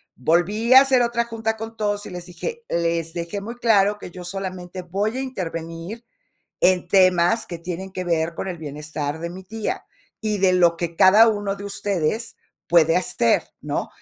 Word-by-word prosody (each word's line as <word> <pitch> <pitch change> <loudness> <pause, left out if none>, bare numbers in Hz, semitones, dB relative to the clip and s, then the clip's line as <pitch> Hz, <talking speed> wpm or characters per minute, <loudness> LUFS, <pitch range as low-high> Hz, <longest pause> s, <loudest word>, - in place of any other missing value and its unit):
volví 175 - +2
a 260 - +11
hacer 265 -2 +3
otra 235 0 +1
junta 225 -1 -3
con 225 +1 -7
todos, 205 -1 -2
y - - -7
les 180 -1 -7
dije, 465 - -6
les 165 -1 -1
dejé 170 +4 -4
muy 230 +4 -7
claro 210 -4 +3
que 180 - -10
yo 180 0 -9
solamente 185 0 -6
voy 200 +7 -2
a - - -1
intervenir 175 -2 -6 0.6
en 180 -1 +3
temas 185 +2 +4
que 170 - -6
tienen 180 +3 -6
que 185 - -4
ver 165 -1 0
con 190 - -4
el 180 -2 -5
bienestar 150 0 -5
de 170 +1 -4
mi 185 +2 -9
tía, 220 +3 -4 0.4
y 215 -2 -1
de 190 -1 +4
lo 175 -2 +4
que 170 -1 -4
cada 210 +6 +7
uno 205 -2 -1
de 200 - -9
ustedes 200 +2 -2 0.3
puede 165 -1 +5
hacer, 120 -9 +2 0.2
¿no? - - -2
185 Hz, 185 wpm, -22 LUFS, 170-220 Hz, 0.6 s, a